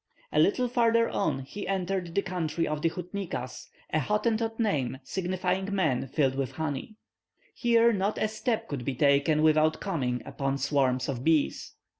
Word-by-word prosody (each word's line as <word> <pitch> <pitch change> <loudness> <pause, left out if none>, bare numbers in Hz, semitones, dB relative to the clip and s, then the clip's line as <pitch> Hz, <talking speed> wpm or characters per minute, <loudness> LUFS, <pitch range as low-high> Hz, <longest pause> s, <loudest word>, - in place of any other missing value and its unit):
A 150 - +2
little 205 +10 +3
farther 230 -1 +3
on 140 -9 0
he 195 +10 -7
entered 185 -2 -2
the 200 - +2
country 170 -3 -2
of 150 0 -2
the 165 - +2
Houtniquas, 175 -7 -5 0.3
a 155 - +3
Hottentot 225 - 0
name 140 - 0
signifying 185 +4 -2
men 135 -9 +1
filled 135 0 +1
with 135 -2 -3
honey. 160 +6 -4 0.6
Here 235 -1 +4
not 200 +1 0
a - - +1
step 220 +1 -2
could 140 -4 -4
be 135 +1 -2
taken 145 +3 +3
without 155 0 +4
coming 130 -10 -2
upon 135 0 -2
swarms 135 -2 +1
of 130 -3 -3
bees. 160 -1 +1
165 Hz, 160 wpm, -28 LUFS, 140-200 Hz, 0.6 s, Here